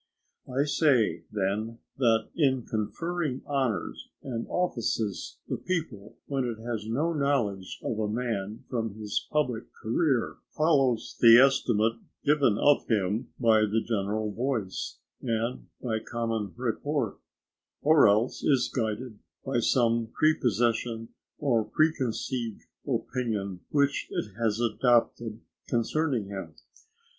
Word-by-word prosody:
I 135 Hz, +3 st, +2 dB
say, 135 Hz, -, +2 dB
then, 105 Hz, +3 st, -1 dB, 0.2 s
that 115 Hz, -4 st, +3 dB
in 130 Hz, -6 st, +2 dB
conferring 150 Hz, +6 st, -2 dB
honours 135 Hz, -6 st, -2 dB
and 115 Hz, -4 st, -4 dB
offices, 115 Hz, -, -1 dB
the -, -, -2 dB
people, 150 Hz, -, -4 dB
when 135 Hz, -2 st, -1 dB
it 120 Hz, -3 st, -3 dB
has 115 Hz, -3 st, -3 dB
no 150 Hz, +9 st, 0 dB
knowledge 120 Hz, -, -1 dB
of 110 Hz, -, -2 dB
a 110 Hz, -, 0 dB
man 110 Hz, -2 st, -3 dB
from 115 Hz, -4 st, -2 dB
his 105 Hz, -1 st, -3 dB
public 125 Hz, -7 st, -1 dB
career, 125 Hz, +2 st, 0 dB
follows 135 Hz, -7 st, +2 dB
the 115 Hz, -1 st, +9 dB
estimate 115 Hz, -4 st, +3 dB, 0.3 s
given 140 Hz, -7 st, +4 dB
of 145 Hz, +4 st, +3 dB
him 105 Hz, 0 st, 0 dB
by 115 Hz, -3 st, +5 dB
the 110 Hz, +1 st, +2 dB
general 105 Hz, -1 st, -1 dB
voice, 115 Hz, -5 st, -2 dB, 0.2 s
and 115 Hz, +1 st, -2 dB, 0.2 s
by 110 Hz, -3 st, 0 dB
common 115 Hz, -3 st, -3 dB
report; 125 Hz, 0 st, -2 dB, 0.6 s
or 150 Hz, -4 st, +6 dB
else 110 Hz, +5 st, +2 dB
is 130 Hz, -4 st, +2 dB
guided 110 Hz, -1 st, -2 dB, 0.3 s
by 135 Hz, -3 st, +1 dB
some 115 Hz, -1 st, +2 dB
prepossession 115 Hz, -5 st, +1 dB, 0.3 s
or 120 Hz, -6 st, +2 dB
preconceived 130 Hz, -5 st, -1 dB, 0.2 s
opinion 115 Hz, -6 st, -2 dB
which 140 Hz, -1 st, +1 dB
it 105 Hz, -, -3 dB
has 110 Hz, -1 st, +1 dB
adopted 120 Hz, -1 st, +1 dB, 0.3 s
concerning 125 Hz, 0 st, 0 dB
him. 95 Hz, -5 st, -7 dB
115 Hz, 115 wpm, -28 LUFS, 110-135 Hz, 0.6 s, the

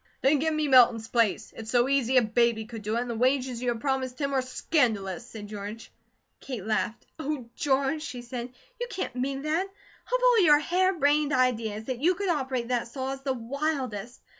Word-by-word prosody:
"Then 280 Hz, +2 st, +4 dB
give 320 Hz, +3 st, +1 dB
me 310 Hz, -1 st, 0 dB
Milton's 240 Hz, -4 st, +5 dB
place. 230 Hz, -4 st, +1 dB
It's 220 Hz, -1 st, -8 dB
so 245 Hz, +1 st, +3 dB
easy 265 Hz, -2 st, +2 dB
a 250 Hz, -, +6 dB
baby 225 Hz, 0 st, +1 dB
could 225 Hz, -1 st, -8 dB
do 210 Hz, +2 st, -2 dB
it, -, -, +1 dB
and 245 Hz, -, -4 dB
the 235 Hz, -, -3 dB
wages 250 Hz, +1 st, +1 dB
you 250 Hz, -, -3 dB
have 235 Hz, -2 st, -2 dB
promised 265 Hz, -2 st, -1 dB
him 280 Hz, -1 st, -1 dB
are 265 Hz, -, +2 dB
scandalous," 235 Hz, -, 0 dB
said 220 Hz, -4 st, -8 dB
George. 210 Hz, +2 st, -7 dB, 0.5 s
Kate 245 Hz, -8 st, -6 dB
laughed. 220 Hz, +1 st, -1 dB
"Oh, 280 Hz, -6 st, -4 dB
George," 275 Hz, +2 st, +1 dB
she 250 Hz, -6 st, -6 dB
said, 245 Hz, 0 st, -6 dB, 0.3 s
"you 485 Hz, -, -2 dB
can't 380 Hz, -, -4 dB
mean 270 Hz, +2 st, -2 dB
that! 320 Hz, +5 st, 0 dB
Of 400 Hz, +5 st, -5 dB
all 485 Hz, -5 st, +6 dB
your 300 Hz, -3 st, +7 dB
hare 370 Hz, +5 st, +1 dB
brained 295 Hz, 0 st, +2 dB
ideas, 230 Hz, -4 st, +1 dB
that 255 Hz, 0 st, -4 dB
you 355 Hz, +4 st, +3 dB
could 395 Hz, +1 st, -2 dB
operate 265 Hz, -6 st, -1 dB
that 245 Hz, -2 st, 0 dB
saw, 265 Hz, +2 st, -4 dB
is 270 Hz, -, -8 dB
the 270 Hz, -1 st, -1 dB
wildest. 255 Hz, -3 st, -3 dB
255 Hz, 205 wpm, -27 LUFS, 235-290 Hz, 0.5 s, your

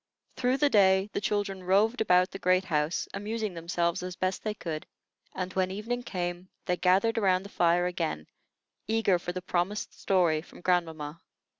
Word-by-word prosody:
Through 250 Hz, +1 st, +1 dB
the 290 Hz, 0 st, +3 dB
day 190 Hz, 0 st, +4 dB
the -, -, -1 dB
children 200 Hz, -1 st, -1 dB
roved 210 Hz, +6 st, +2 dB
about 180 Hz, -3 st, +4 dB
the 195 Hz, -, -7 dB
great 185 Hz, +1 st, +2 dB
house, 150 Hz, -1 st, 0 dB
amusing 215 Hz, 0 st, -3 dB
themselves 170 Hz, 0 st, -1 dB
as 180 Hz, 0 st, -5 dB
best 185 Hz, +1 st, -2 dB
they 215 Hz, -1 st, -2 dB
could; 160 Hz, -5 st, -5 dB, 0.5 s
and, 185 Hz, 0 st, -3 dB
when 185 Hz, -1 st, +1 dB
evening 220 Hz, +6 st, -3 dB
came, 180 Hz, -4 st, -4 dB, 0.2 s
they 180 Hz, -, +1 dB
gathered 195 Hz, +6 st, +3 dB
around 190 Hz, -3 st, +2 dB
the 200 Hz, -, -10 dB
fire 175 Hz, -1 st, +2 dB
again, 165 Hz, -, -2 dB, 0.6 s
eager 220 Hz, -4 st, +2 dB
for 175 Hz, -, -4 dB
the 180 Hz, 0 st, -6 dB
promised 185 Hz, +3 st, -1 dB
story 175 Hz, -5 st, +2 dB
from 170 Hz, -, -15 dB
grandmamma. 165 Hz, -4 st, -1 dB
185 Hz, 170 wpm, -29 LUFS, 175-205 Hz, 0.6 s, day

